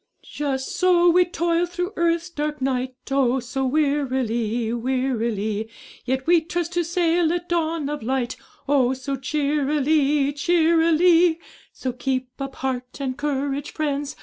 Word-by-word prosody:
Just 270 -3 -3
so 350 -1 +5
we 360 +1 +5
toil 345 0 0
through 360 +3 -4
earth's 340 +1 0
dark 300 -1 -3
night, 260 -1 -1 0.2
Oh! 265 -1 +2
so 260 +2 -2
wearily, 250 -6 0
wearily; 230 -4 -1 0.4
Yet 260 +1 -1
we 340 0 +5
trust 340 +1 -3
to 350 0 +1
sail 335 -1 +1
at 350 0 -2
dawn 325 -3 -1
of 295 -1 -4
light, 255 +1 -1 0.3
Oh! 265 -3 +3
so 275 +1 -4
cheerily, 290 +1 +1
cheerily; 335 +1 +4 0.3
So 255 -1 -4
keep 255 0 -2
up 275 -1 -5
heart 255 -1 -4
and 265 -2 -2
courage, 285 0 -2
friends! 290 -2 -2
285 Hz, 135 wpm, -23 LUFS, 260-335 Hz, 0.4 s, so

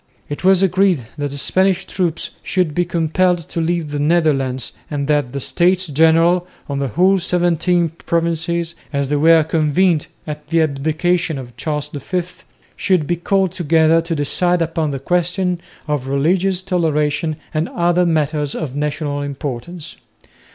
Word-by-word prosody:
It 145 - -5
was 190 0 +5
agreed 185 - +2
that 145 0 -1
the 140 - -6
Spanish 190 +5 +1
troops 175 -4 -2
should 180 -5 0
be 175 +3 +1
compelled 175 +2 +1
to 165 - -2
leave 165 -2 -1
the 145 - -2
Netherlands 145 -5 +1 0.2
and 140 -2 -2
that 145 -4 +1
the 140 - -4
States 180 +6 +2
General 165 +3 +3 0.2
of 140 -1 -3
the 140 - -1
whole 185 +7 +3
seventeen 175 -1 +1
provinces, 170 +1 -2 0.2
as 140 -2 -1
they 150 - +1
were 160 +2 +5
convened 160 +1 +1 0.2
at 150 -1 -7
the 165 +1 +1
abdication 155 +3 0
of 120 -2 -9
Charles 150 -1 -3
V, 175 +5 -3 0.5
should 185 -6 +1
be 175 - 0
called 190 +1 +1
together 165 -1 +3
to 165 0 -3
decide 170 +4 +2
upon 165 -1 -1
the 140 - -3
question 180 +3 -1 0.3
of 145 -3 -2
religious 180 +7 +1
toleration 155 -3 0 0.2
and 155 +2 -1
other 175 +1 +2
matters 150 -3 0
of 140 -5 -4
national 145 0 -2
importance. 145 +3 -6
165 Hz, 150 wpm, -18 LUFS, 145-175 Hz, 0.5 s, was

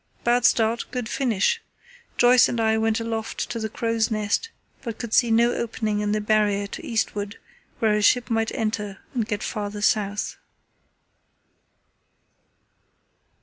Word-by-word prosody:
Bad 240 0 +2
start, 230 +1 +3
good 250 -3 -4
finish! 230 -6 +1 0.6
Joyce 245 0 +6
and 240 - -2
I 220 -1 +3
went 220 0 +1
aloft 225 -1 -3
to 230 - -3
the 220 0 -3
crow's 230 0 0
nest, 215 - -1 0.3
but 230 -3 -5
could 235 -2 -6
see 240 - +4
no 235 +2 +4
opening 220 -2 -2
in 210 0 -1
the 215 - +1
Barrier 210 -1 +1
to 200 - -8
eastward 210 -2 -2 0.4
where 220 -2 +2
a 210 - +1
ship 245 +3 +4
might 225 0 +1
enter 210 -3 -2 0.2
and 235 -4 -1
get 210 -2 -3
farther 205 -1 -4
south." 205 -1 0
220 Hz, 145 wpm, -24 LUFS, 210-230 Hz, 0.6 s, Joyce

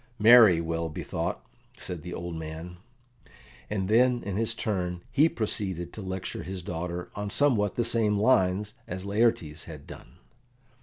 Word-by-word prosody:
"Marry, 110 -5 +8
well 85 0 -2
bethought," 65 -4 -4 0.3
said 90 -3 -6
the 90 - -8
old 85 0 -5
man; 80 +2 -7 0.9
and 95 -3 -1
then 120 +3 +3
in 100 -2 -4
his 115 +2 0
turn 90 -5 -2
he 150 +4 +4
proceeded 95 - -3
to 110 - -7
lecture 95 -1 -4
his 95 -1 -6
daughter 90 +1 -4
on 105 0 -4
somewhat 110 -5 +2
the 120 - 0
same 110 -3 +1
lines 105 -2 +2
as 95 +2 -5
Laertes 100 -7 +1
had 75 -4 -10
done. - - -12
95 Hz, 150 wpm, -28 LUFS, 85-110 Hz, 0.9 s, Marry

